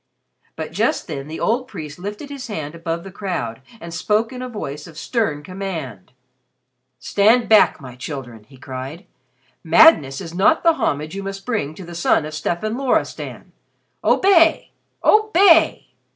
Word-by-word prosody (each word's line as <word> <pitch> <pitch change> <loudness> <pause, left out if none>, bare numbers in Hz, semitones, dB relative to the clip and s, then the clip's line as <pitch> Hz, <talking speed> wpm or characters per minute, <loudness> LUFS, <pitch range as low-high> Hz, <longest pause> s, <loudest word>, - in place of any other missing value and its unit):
But - - -6
just - - 0
then 135 +1 -6
the 155 - -7
old 250 +3 0
priest 155 - -8
lifted 210 +9 -7
his 275 -2 -7
hand 155 -8 -5
above 165 0 -4
the 195 - -10
crowd, 130 - -4 0.2
and 170 -3 -9
spoke 215 +8 0
in 250 - -7
a 255 - -5
voice 150 - -6
of 160 -2 -14
stern 165 - -1
command. 165 - -6 0.9
"Stand 220 - +3
back, 215 -6 +5
my 130 -4 -10
children!" 125 -4 -7
he 135 +3 -18
cried. 130 +5 -8 0.6
"Madness 160 - +5
is 165 - -8
not 200 - +3
the 335 -1 +5
homage 155 - -2
you 195 - -4
must 195 0 -7
bring 180 - -2
to 185 - -9
the 175 - -10
son 170 -2 +2
of 155 - -7
Stefan 175 - -2
Loristan. 270 -2 -2 0.5
Obey! 345 -4 +4 0.3
Obey!" 400 -5 +4
175 Hz, 155 wpm, -20 LUFS, 150-230 Hz, 0.9 s, back